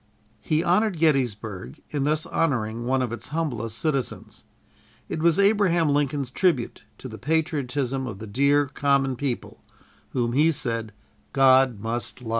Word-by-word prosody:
He 155 Hz, +1 st, 0 dB
honored 190 Hz, +1 st, +2 dB
Gettysburg 120 Hz, -, -1 dB
in 145 Hz, -2 st, -1 dB
thus 155 Hz, +1 st, 0 dB
honoring 120 Hz, -7 st, -1 dB
one 130 Hz, 0 st, +2 dB
of 120 Hz, -, -3 dB
its 120 Hz, -, -6 dB
humblest 125 Hz, -8 st, -3 dB
citizens. 135 Hz, 0 st, -3 dB, 0.6 s
It -, -, -4 dB
was 165 Hz, -1 st, +4 dB
Abraham 195 Hz, -5 st, +3 dB
Lincoln's 140 Hz, -2 st, 0 dB
tribute 135 Hz, -, 0 dB
to -, -, -8 dB
the 110 Hz, -3 st, -9 dB
patriotism 135 Hz, -3 st, -1 dB
of 105 Hz, -5 st, -6 dB
the 110 Hz, -, -8 dB
dear 140 Hz, +7 st, +2 dB
"common 140 Hz, -1 st, +1 dB
people" 130 Hz, -1 st, -4 dB, 0.5 s
whom 120 Hz, -2 st, -1 dB
he 155 Hz, +5 st, +4 dB
said 115 Hz, -6 st, -3 dB, 0.4 s
"God 130 Hz, -4 st, +5 dB
must 115 Hz, +3 st, -4 dB
love." 120 Hz, -3 st, -8 dB
135 Hz, 145 wpm, -25 LUFS, 120-155 Hz, 0.6 s, God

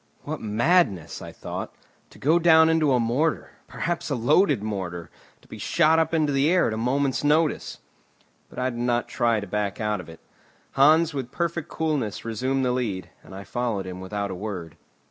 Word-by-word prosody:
"What -, -, -5 dB
madness," 110 Hz, -, +1 dB
I -, -, -8 dB
thought, -, -, -7 dB, 0.3 s
"to -, -, -17 dB
go 160 Hz, +5 st, +3 dB
down 160 Hz, -1 st, +6 dB
into 160 Hz, -3 st, +3 dB
a 125 Hz, -, +3 dB
mortar, 125 Hz, +8 st, 0 dB, 0.2 s
perhaps 170 Hz, -1 st, -3 dB
a 140 Hz, -, 0 dB
loaded 140 Hz, -, +3 dB
mortar, 90 Hz, -6 st, -5 dB, 0.3 s
to -, -, -21 dB
be -, -, -10 dB
shot 160 Hz, -1 st, +3 dB
up 160 Hz, -1 st, +1 dB
into 155 Hz, -3 st, +1 dB
the 135 Hz, +3 st, +3 dB
air 180 Hz, +1 st, +3 dB
at 110 Hz, -, -1 dB
a -, -, -3 dB
moment's 130 Hz, +4 st, 0 dB
notice!" 150 Hz, +1 st, +1 dB, 0.7 s
But -, -, -16 dB
I 130 Hz, 0 st, 0 dB
did 120 Hz, -, -7 dB
not 120 Hz, 0 st, 0 dB
try 115 Hz, -2 st, +1 dB
to 100 Hz, -, -6 dB
back 100 Hz, 0 st, -2 dB
out 105 Hz, -3 st, -1 dB
of 85 Hz, -, -14 dB
it. 80 Hz, -, -12 dB, 0.5 s
Hans 155 Hz, +4 st, +4 dB
with 135 Hz, -3 st, -4 dB
perfect 170 Hz, -2 st, -3 dB
coolness 145 Hz, -12 st, -2 dB
resumed 130 Hz, +4 st, -1 dB
the 125 Hz, -, +1 dB
lead, 110 Hz, -7 st, -3 dB
and -, -, -13 dB
I 100 Hz, -, -7 dB
followed 110 Hz, -1 st, -2 dB
him 90 Hz, 0 st, -7 dB
without 100 Hz, +1 st, -4 dB
a -, -, -3 dB
word. 90 Hz, -5 st, -6 dB
125 Hz, 195 wpm, -25 LUFS, 105-155 Hz, 0.7 s, down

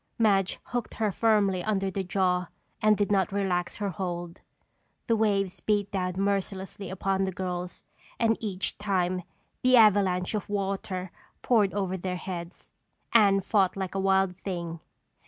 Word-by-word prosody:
Madge 195 Hz, -4 st, +2 dB
hooked 245 Hz, -2 st, -4 dB
her 215 Hz, -2 st, 0 dB
firmly 200 Hz, -4 st, +2 dB
under 195 Hz, -3 st, 0 dB
the 195 Hz, -, -2 dB
jaw 180 Hz, -1 st, +1 dB, 0.3 s
and 215 Hz, -1 st, +4 dB
did 205 Hz, 0 st, 0 dB
not 195 Hz, 0 st, +2 dB
relax 190 Hz, -3 st, -1 dB
her 205 Hz, -1 st, -2 dB
hold. 175 Hz, -1 st, -5 dB, 0.6 s
The 230 Hz, -, +2 dB
waves 195 Hz, -4 st, +1 dB
beat 205 Hz, +1 st, 0 dB
down 185 Hz, -2 st, -1 dB
mercilessly 195 Hz, -1 st, -2 dB
upon 195 Hz, 0 st, 0 dB
the 190 Hz, -, -2 dB
girls 180 Hz, -1 st, -5 dB, 0.3 s
and 225 Hz, -1 st, +3 dB
each 195 Hz, -4 st, -3 dB
time 185 Hz, -3 st, 0 dB, 0.4 s
the 255 Hz, 0 st, +5 dB
avalanche 195 Hz, -4 st, +4 dB
of 210 Hz, -1 st, -3 dB
water 195 Hz, -2 st, -3 dB, 0.3 s
poured 215 Hz, -6 st, +3 dB
over 190 Hz, -2 st, -1 dB
their 180 Hz, 0 st, -3 dB
heads. 175 Hz, 0 st, -7 dB, 0.4 s
Anne 200 Hz, -4 st, +5 dB
fought 195 Hz, -1 st, +2 dB
like 190 Hz, -1 st, -3 dB
a 195 Hz, -, -1 dB
wild 190 Hz, -1 st, +2 dB
thing. 170 Hz, -4 st, -5 dB
195 Hz, 150 wpm, -28 LUFS, 185-205 Hz, 0.6 s, the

